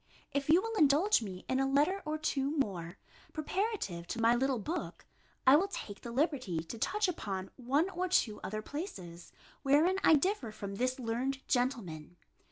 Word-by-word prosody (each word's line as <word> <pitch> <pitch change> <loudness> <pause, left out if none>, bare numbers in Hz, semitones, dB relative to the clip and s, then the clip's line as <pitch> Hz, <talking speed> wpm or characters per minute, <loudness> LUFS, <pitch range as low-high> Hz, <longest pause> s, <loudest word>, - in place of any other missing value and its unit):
if 280 0 -2
you 345 +5 +6
will 455 0 -3
indulge 305 - +4
me 190 -4 -7
in 260 - +1
a 270 0 +1
letter 300 +8 +2
or 305 0 -1
two 300 -1 -1
more, 180 -10 -2 0.4
preparative 310 - -2
to 230 - -4
my 230 +1 +5
little 260 +1 +1
book, 315 - -5 0.4
I 260 - +8
will 365 +6 +3
take 210 - -7
the 235 - -7
liberty 250 - 0
to 220 +7 -8
touch 415 - +1
upon 195 - -4
one 275 +7 +1
or 365 0 -1
two 235 -12 +2
other 215 +3 -4
places, 185 - -7 0.3
wherein 305 +7 +3
I 320 - +7
differ 295 - 0
from 200 -2 -6
this 255 +3 0
learned 255 +3 -2
gentleman. 190 - -1
270 Hz, 175 wpm, -32 LUFS, 215-315 Hz, 0.4 s, I